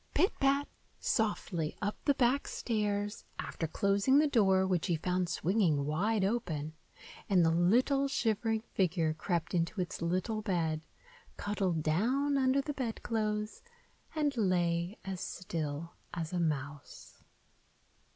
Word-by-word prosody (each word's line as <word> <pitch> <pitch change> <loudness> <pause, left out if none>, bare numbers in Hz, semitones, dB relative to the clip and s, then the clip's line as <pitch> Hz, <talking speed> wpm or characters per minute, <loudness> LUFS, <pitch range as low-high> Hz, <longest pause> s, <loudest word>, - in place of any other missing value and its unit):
Pit 380 - +3
pat, 275 +1 +2 0.3
softly, 195 -7 -1
up 205 +1 -1
the 285 - +4
back 260 +3 +2
stairs, 205 -2 -2
after 165 - -3
closing 200 - +3
the 300 - +5
door, 195 -9 +4
which 185 -2 0
he 175 - +2
found 180 +2 -1
swinging 175 -6 +1
wide 195 +7 +1
open, 165 -9 -2 0.6
and 180 -4 +5
the 165 - +4
little 245 - +3
shivering 225 -3 0
figure 165 -4 +1
crept 165 0 -2
into 170 +3 0
its 180 -2 -3
little 185 +6 -1
bed, 165 -6 0 0.6
cuddled 190 -6 -1
down 255 - +1
under 265 0 +3
the 295 +2 -4
bedclothes 220 -4 -2 0.5
and 295 -3 +1
lay 175 -3 +1
as 190 -2 -4
still 165 -2 -4 0.2
as 165 0 -4
a 180 - 0
mouse. 145 -3 -4
195 Hz, 130 wpm, -32 LUFS, 170-225 Hz, 0.6 s, the